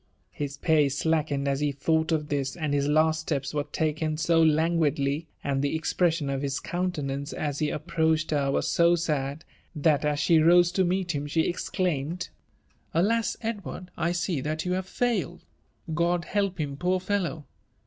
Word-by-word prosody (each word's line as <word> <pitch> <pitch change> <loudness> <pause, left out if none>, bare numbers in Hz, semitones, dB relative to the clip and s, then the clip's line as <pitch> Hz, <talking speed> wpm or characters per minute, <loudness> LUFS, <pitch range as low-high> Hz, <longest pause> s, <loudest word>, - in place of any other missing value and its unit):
His 145 -1 -5
pace 150 -5 +2
slackened 150 -3 0
as 140 0 0
be 150 -1 +1
thought 160 +4 0
of 150 -2 0
this; 140 -2 -1
and 155 -4 -2
his 140 0 +1
laat 155 +1 +3
^teps 140 -3 -2
w^^t» 145 0 -2
laken 155 0 -1
so 165 0 +3
lapguidlyi 155 -2 +1 0.2
and 135 -1 0
the 145 +3 0
ejipresion 160 -4 0
of 135 - -2
his 140 -1 -2
countenance 150 -6 -3
aa 150 -1 -2
be 150 -2 0
ap 150 - -5
l^roached 160 -2 +1
her 140 -2 +1
was 135 - 0
so 170 0 +4
sad, 150 -2 -2 0.3
that 150 -1 +2
aa 150 0 +2
ahe 155 +2 +3
rose 175 +1 +6
to 190 +1 +2
meet 180 0 0
him 145 0 -3
she 160 +2 +1
#x$iiaJmA^, 175 -2 -2 0.2
' - - -39
' - - -40
Alas 220 +7 +2
I - - -1
Edward, 200 -4 -7
I 170 +1 0
see 175 -4 -1
that 155 +4 -3
you 180 - -1
have 185 +1 -1
foiled 245 +3 -1 0.4
1 165 -1 -3
Ood 170 -2 -4
help 195 -1 -1
him* 140 -2 -3
f^r 180 +3 +1
fellow 185 -5 -2
160 Hz, 190 wpm, -27 LUFS, 145-175 Hz, 0.4 s, rose